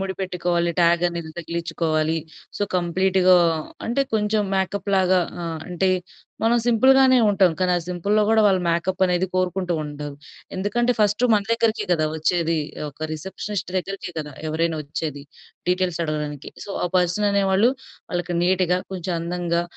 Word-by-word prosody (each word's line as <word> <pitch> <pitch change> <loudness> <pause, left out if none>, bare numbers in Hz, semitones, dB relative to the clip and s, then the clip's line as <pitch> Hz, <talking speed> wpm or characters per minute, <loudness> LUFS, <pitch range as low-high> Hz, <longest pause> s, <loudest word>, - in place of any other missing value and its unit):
ముడి 190 0 -3
పెట్టుకోవాలి, 175 -2 0
ట్యాగ్ 170 0 +4
అనేది 170 -2 -6
తగిలించుకోవాలి, 165 -1 -1 0.4
సో, - - -2
కంప్లీట్‌గా 185 +1 +3 0.5
అంటే 245 +4 +1
కొంచెం 210 0 +1
మేకప్‌లాగా 190 -1 +1 0.2
ఆహ్, 165 -1 -4
అంటే 180 +2 0 0.5
మనం 230 +2 +3
సింపుల్‌గానే 260 +2 +5
ఉంటాం. 190 -4 +4
కానీ 185 -1 +2
ఆ - - +2
సింపుల్‌లో 200 +4 +1
కూడా 220 0 +5
వాళ్ళు 190 -2 +3
మేకప్ 180 +3 0
అనేది 180 +1 +1
కోరుకుంటూ 185 -1 0
ఉంటారు. 145 -1 -7 0.4
ఎందుకంటే 240 +6 +1
ఫస్ట్ 210 +3 +2
మన 205 - +2
దగ్గరికే 230 -1 +1
కదా 155 -2 +2
వచ్చేది! 165 0 +1 0.3
ఒక 155 +2 -6
రిసెప్షనిస్ట్ 190 +4 -5
దగ్గరికే 190 -1 -6
కదా! 150 -1 -8 0.2
ఎవరైనా 160 +1 0
వచ్చేది 145 -1 -5 0.5
డీటెయిల్స్ 180 -2 0
అడగడానికి. 150 -2 -4 0.2
సో, 200 - -7 0.2
ఆ - - -4
పర్సన్ 180 +4 +2
అనేవాళ్ళు 200 +4 +3 0.4
వాళ్ళకి 175 -1 -2
నీట్‌గా, 180 0 +2 0.2
కొంచెం 180 -1 -3
అందంగా, 170 0 -1
180 Hz, 140 wpm, -23 LUFS, 170-195 Hz, 0.5 s, సింపుల్‌గానే